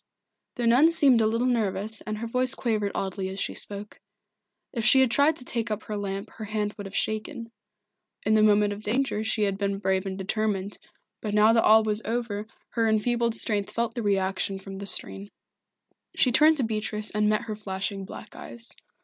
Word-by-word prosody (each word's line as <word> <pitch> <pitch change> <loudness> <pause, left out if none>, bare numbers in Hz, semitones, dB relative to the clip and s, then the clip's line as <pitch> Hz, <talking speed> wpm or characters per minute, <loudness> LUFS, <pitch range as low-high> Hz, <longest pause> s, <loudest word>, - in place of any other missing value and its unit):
The 240 - -2
nun 250 +8 +6
seemed 280 -8 +4
a 215 - +3
little 230 +3 0
nervous 220 -3 -1
and 215 0 -3
her 230 - -4
voice 255 +3 +1
quavered 215 -4 -1
oddly 190 0 -3
as 190 +1 -5
she - - -1
spoke. 205 0 -3 0.7
If 235 -4 -2
she 265 +3 +6
had 260 -3 +3
tried 285 +5 +4
to 250 - -8
take 235 -1 -2
up 215 0 -3
her 215 - -5
lamp 200 -1 -4
her 220 - -5
hand 210 0 -2
would 205 -2 -8
have 195 - -10
shaken. 225 +2 -2 0.7
In 215 - +3
the 215 - +5
moment 210 -1 +4
of 205 - -9
danger 220 0 0
she 220 -1 0
had 200 -1 -1
been 200 -1 -1
brave 190 -1 0
and 190 0 -4
determined, 200 0 -2 0.4
but 210 -1 -3
now 215 +2 +6
that 225 - +4
all 220 +1 +6
was 215 0 0
over 220 -2 -3 0.2
her 225 -2 +1
enfeebled 235 +1 +1
strength 205 -3 +1
felt 235 0 -2
the 240 - -3
reaction 195 -1 0
from 195 0 -9
the 200 - -6
strain. 200 +1 -5 0.9
She 255 - +3
turned 305 +5 +5
to 270 - +1
Beatrice 215 -1 -2
and 210 0 +1
met 215 +2 +1
her 220 -3 -5
flashing 195 -1 -4
black 190 - -10
eyes. 235 -1 -6
215 Hz, 200 wpm, -26 LUFS, 200-230 Hz, 0.9 s, nun